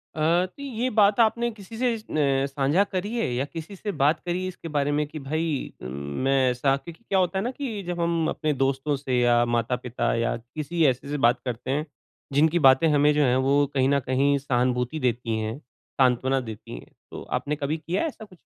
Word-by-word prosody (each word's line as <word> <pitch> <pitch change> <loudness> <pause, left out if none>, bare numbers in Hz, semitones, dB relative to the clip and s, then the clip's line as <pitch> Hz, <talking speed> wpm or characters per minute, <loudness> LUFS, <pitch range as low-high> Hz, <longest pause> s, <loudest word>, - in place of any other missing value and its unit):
अ, 165 +3 +2
तो 185 +9 -13
ये 255 -2 -2
बात 210 -1 +3
आपने 235 +1 +3
किसी 220 0 -11
से 245 0 +1
अ, 140 -10 0
साझा 140 +6 +2
करी 205 +3 -4
है 230 - 0
या 130 +3 -1
किसी 165 +6 -8
से 205 +2 -4
बात 150 -2 +2
करी 180 +1 -2
इसके 180 -2 -8
बारे 145 -2 0
में? 150 +1 +1
कि 155 +1 -8
भई 155 +1 -2
उम, - - -6 0.4
मैं 135 -1 +3
ऐसा 135 +2 +1
क्योंकि 165 +9 -12
क्या 195 - +3
होता 185 +1 +1
है 195 - -2
न 245 - -1
कि 230 -8 -4
जब 175 -1 -3
हम 170 -1 +1
अपने 155 -1 -1
दोस्तों 135 +2 0
से 130 -3 -1
या 120 -1 +4
माता-पिता 120 +1 -1
या 115 0 0
किसी 150 +8 -3
ऐसे 130 0 +1
से 150 - -1
बात 120 -2 +3
करते 125 +1 -3
हैं, 150 +3 0 0.5
जिनकी 160 +4 +3
बातें 135 +2 +6
हमें 145 +1 +4
जो 150 0 +3
हैं 125 -2 +3
वो 140 +2 +3
कहीं 135 -1 +2
न 140 0 +3
कहीं 135 +2 +1
सहानुभूति 125 +1 0
देती 120 -3 -1
हैं, 110 +2 -3 0.4
सांत्वना 130 +1 +3
देती 110 - -8
हैं। - - -17 0.2
तो - - -7 0.2
आपने 150 +1 -3
कभी 150 +1 -2
किया 170 +4 -2
है - - +1
ऐसा 245 -7 -8
कुछ? 185 -4 -18
145 Hz, 215 wpm, -25 LUFS, 130-175 Hz, 0.5 s, बातें